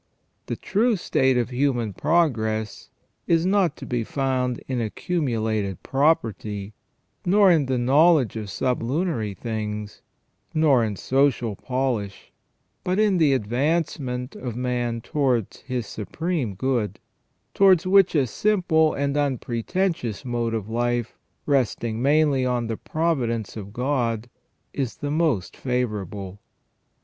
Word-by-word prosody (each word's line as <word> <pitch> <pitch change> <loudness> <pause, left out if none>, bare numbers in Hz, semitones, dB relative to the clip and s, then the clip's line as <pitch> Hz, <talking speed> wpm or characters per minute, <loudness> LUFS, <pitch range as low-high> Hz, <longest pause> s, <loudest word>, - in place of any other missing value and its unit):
The - - -2
true 225 +2 +1
test - - -11 0.2
of 125 +1 0
human 125 -5 0
pro 165 - +3
gress 110 -4 -4 0.4
is 165 0 +3
not 185 -5 +2
to - - -8
be 120 -2 -1
found 130 -1 -1
in 130 -2 -1
accumulated 110 - -2
property, 110 -8 0 0.5
nor 195 +1 +5
in 155 -6 +3
the 130 -1 0
knowledge 140 +1 +4
of 110 -2 -5
sublunary 125 - -1
things, 105 0 -5 0.5
nor 145 -6 +4
in 105 -2 -2
social 130 -2 +1
polish, 125 -5 -3 0.5
but 185 +1 0
in 210 -4 +3
the 150 -4 +4
advancement 130 +1 -1
of 120 -3 -5
man 120 -2 -1
towards 125 -5 0
his 125 -3 -3
Supreme 125 - -3
Good, 110 -3 -1 0.5
towards 190 -3 +5
which 190 -1 +5
a 140 -3 +4
simple 160 - +2
and 140 0 -1
unpretentious 140 - -1
mode 120 -2 -1
of 105 -3 -4
life, 120 +1 -1 0.3
resting 120 -5 0
mainly 145 -1 +3
on 125 -2 0
the 115 0 -2
pro 165 +2 0
vidence 115 -4 -3
of 100 -2 -7
God, 120 -2 -1 0.4
is 130 -4 -2
the 145 -1 -4
most 150 - 0
favourable. 105 -6 -3
125 Hz, 125 wpm, -24 LUFS, 115-155 Hz, 0.5 s, nor